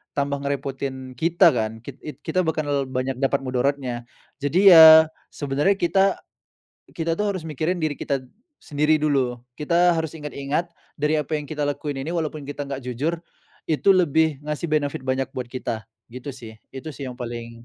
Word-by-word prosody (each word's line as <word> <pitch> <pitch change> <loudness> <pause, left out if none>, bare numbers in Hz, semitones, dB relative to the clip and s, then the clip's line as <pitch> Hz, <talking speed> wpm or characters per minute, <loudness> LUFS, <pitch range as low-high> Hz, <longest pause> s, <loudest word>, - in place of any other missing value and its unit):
tambah 140 0 0
ngerepotin 135 -2 -4
kita 170 +4 +4
kan, 110 -1 -2
kit 125 +3 -10
it 150 - -7
kita 185 +3 +1
bakal 145 -4 0
banyak 130 +1 -2
dapat 135 +1 +2
mudaratnya. 130 -1 -1 0.4
Jadi 180 +8 +3
ya, 160 -1 +10 0.2
sebenarnya 145 +7 0
kita 190 +3 +3 0.9
kita 165 0 -2
tuh 210 +1 0
harus 185 - -4
mikirin 160 +4 -2
diri 155 -2 0
kita 140 -1 -2 0.4
sendiri 150 +1 +1
dulu, 135 -5 +1 0.2
kita 170 +3 +3
harus 160 -2 -2
ingat-ingat 150 +2 -3 0.3
dari 150 +1 +1
apa 150 0 -3
yang 150 - -7
kita 150 0 -3
lakuin 145 0 -3
ini 160 - -4
walaupun 155 -3 -3
kita 145 0 -5
nggak 135 -1 -5
jujur 150 +7 -2 0.5
itu 155 +5 +1
lebih 160 -4 +2
ngasih 150 +3 -3
benefit 150 -3 0
banyak 130 0 -1
buat 125 -1 -4
kita. 115 -4 -5 0.3
Gitu 125 +3 -8
sih, 110 -4 -11 0.2
itu 135 +4 -6
sih 140 0 -7
yang 125 - -7
paling 115 -1 -7
145 Hz, 165 wpm, -23 LUFS, 130-160 Hz, 0.9 s, ya